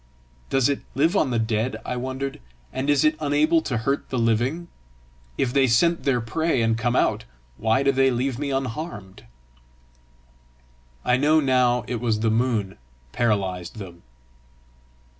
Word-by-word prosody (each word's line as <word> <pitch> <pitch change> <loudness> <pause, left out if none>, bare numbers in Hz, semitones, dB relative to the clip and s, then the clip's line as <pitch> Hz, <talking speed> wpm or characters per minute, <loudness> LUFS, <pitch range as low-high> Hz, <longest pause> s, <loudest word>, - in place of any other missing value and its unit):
"Does 135 -3 +3
it 140 -1 -1
live 160 +8 +2
on 155 - +2
the 120 - 0
dead," 110 +2 -1
I 125 - -3
wondered, 130 - -4 0.3
"and 130 +2 -2
is 145 -1 +3
it 155 +1 +3
unable 155 +2 +2
to 130 -6 -2
hurt 135 +5 -2
the 130 - -2
living? 120 +9 0 0.7
If 125 -2 0
they 135 -1 +4
scent 170 +9 +2
their 135 -3 +2
prey 130 +3 0
and 115 0 +2
come 120 +2 -1
out, 110 -1 +1 0.3
why 110 +4 +1
do 140 - +4
they 135 0 +3
leave 130 0 -1
me 145 -1 -2
unharmed?" 130 - -5 1.8
I 125 0 +3
know 150 +4 +4
now 125 -3 +2
it 120 -2 -4
was 115 -3 +1
that 110 +1 +1
the 110 - +1
moon 110 - -1 0.3
paralysed 100 -5 -1
them. 90 -5 -9
125 Hz, 160 wpm, -24 LUFS, 115-140 Hz, 1.8 s, they